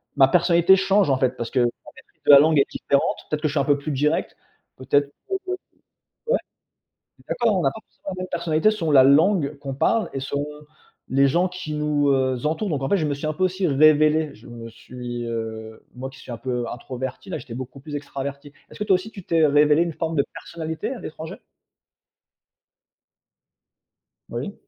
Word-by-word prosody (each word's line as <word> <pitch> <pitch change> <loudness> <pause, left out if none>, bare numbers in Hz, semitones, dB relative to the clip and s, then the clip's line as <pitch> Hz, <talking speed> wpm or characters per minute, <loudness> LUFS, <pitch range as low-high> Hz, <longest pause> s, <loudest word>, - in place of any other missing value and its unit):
ma 135 -2 +6
personnalité 175 +3 +5
change 195 -1 +2
en 135 - +3
fait. 130 -1 +2
Parce 120 -2 -5
que 130 - +1
en - - +4 0.3
fait - - -11
la 140 - +11
langue 155 +1 +4
est 140 - +2
différente, 140 0 0
peut-être 155 -1 -2
que 155 - +1
je - - -6
suis - - +1
un 140 - +1
peu 145 0 +3
plus 145 +2 -5
direct, 150 +3 0 0.4
peut-être 140 +2 +1 0.2
que 385 -1 -4 0.8
ouais? - - +2 0.8
On - - -20
est - - -40
d'accord 235 -3 +1
on - - 0
n'a - - +3
pas 220 - -10
forcément - - -10
la 185 - -4
même 185 - -5
personnalité 165 +4 +2
selon 175 -7 -2
la 135 - +8
langue 150 +1 +3
qu'on 140 -1 -6
parle 220 +11 +1
et 135 - -4
selon, 140 +1 -2
heu, 150 0 -9 0.4
les 135 +1 +4
gens 175 +6 +2
qui 180 -4 -6
nous, 150 -1 +1
heu, 130 -2 +1
entourent 170 +6 -1
donc 140 -3 -2
en 135 - -1
fait, 200 - +3
je 160 -5 0
me 145 - -1
suis 140 +2 -5
un 155 - 0
peu 185 - -4
aussi 185 +1 0
révélé. 155 +1 +4
Je 110 - -17
me 115 -1 -9
suis, 120 +1 -7
heu 110 -1 -6
moi 130 +1 -6
qui 135 - -16
suis 130 - -12
un 115 - -6
peu 125 -1 -3
introverti, 130 +6 -6
là - - -2
j'étais 125 -6 -9
beaucoup 130 +2 -8
plus 145 +2 -9
extraverti. 140 0 -6 0.2
Est - - -13
ce - - -12
que 210 - -2
toi 200 -2 +4
aussi 185 +4 -2
tu 200 -4 -10
t'es 165 -2 +2
révélé 150 +2 +4
une 170 -1 -2
forme 165 +1 -3
de 140 - +3
personnalité 160 +2 -5
à 245 - -9
l'étranger? 160 +3 -7 2.9
Oui. - - -5
150 Hz, 215 wpm, -23 LUFS, 135-170 Hz, 2.9 s, la